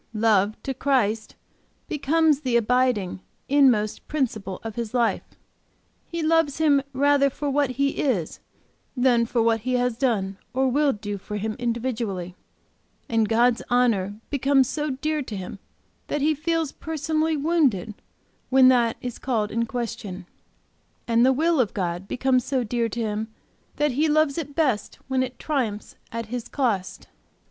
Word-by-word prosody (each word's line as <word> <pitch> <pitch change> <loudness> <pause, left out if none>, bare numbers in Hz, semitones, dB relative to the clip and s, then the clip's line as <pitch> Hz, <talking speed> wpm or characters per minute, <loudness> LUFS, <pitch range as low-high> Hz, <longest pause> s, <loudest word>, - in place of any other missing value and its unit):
Love 215 -1 +2
to 270 - -2
Christ 240 -5 0 0.5
becomes 305 0 +2
the 255 -5 +1
abiding, 235 -5 +1 0.3
inmost 255 -7 +3
principle 220 -10 -2
of 225 -1 -5
his 235 +1 -4
life; 235 -2 +2 0.9
he 335 -1 -4
loves 320 -3 +2
Him 290 -3 +4
rather 280 +1 +3
for 285 +1 -3
what 285 -1 +2
He 275 +2 +1
is, 210 - -1 0.6
than 245 -2 +3
for 235 -1 +1
what 225 0 +2
He 255 +4 -2
has 250 -2 +1
done 195 -7 0 0.2
or 265 +1 +2
will 285 +2 +3
do 205 -3 -5
for 210 +2 -6
him 215 +1 -3
individually, 230 -7 -2 0.7
and 225 -2 +1
God's 235 +1 +3
honor 215 -5 +1
becomes 275 -2 +3
so 300 +2 -2
dear 305 +3 -1
to 225 -6 -6
him 190 +1 -7 0.5
that 295 - -2
he 310 +2 +3
feels 325 0 -1
personally 315 0 -1
wounded 280 - +1 0.6
when 260 0 +6
that 240 -3 +3
is 245 -2 -6
called 225 -5 -1
in 230 +1 -1
question. 215 -6 -5 0.8
And 230 0 +3
the 260 - +5
will 320 +3 +2
of 230 -6 +1
God 180 0 -3
becomes 255 +1 +1
so 260 -1 -1
dear 235 0 -1
to 235 - -5
him 215 -1 -2 0.5
that 295 -1 +1
he 300 +5 +1
loves 310 0 +2
it 285 -3 -6
best 260 -11 0
when 265 -1 +1
it 255 -1 -3
'triumphs 240 -9 -2 0.2
at 230 0 -4
his 240 +2 -5
cost.' 220 -9 -1
250 Hz, 155 wpm, -24 LUFS, 220-280 Hz, 0.9 s, when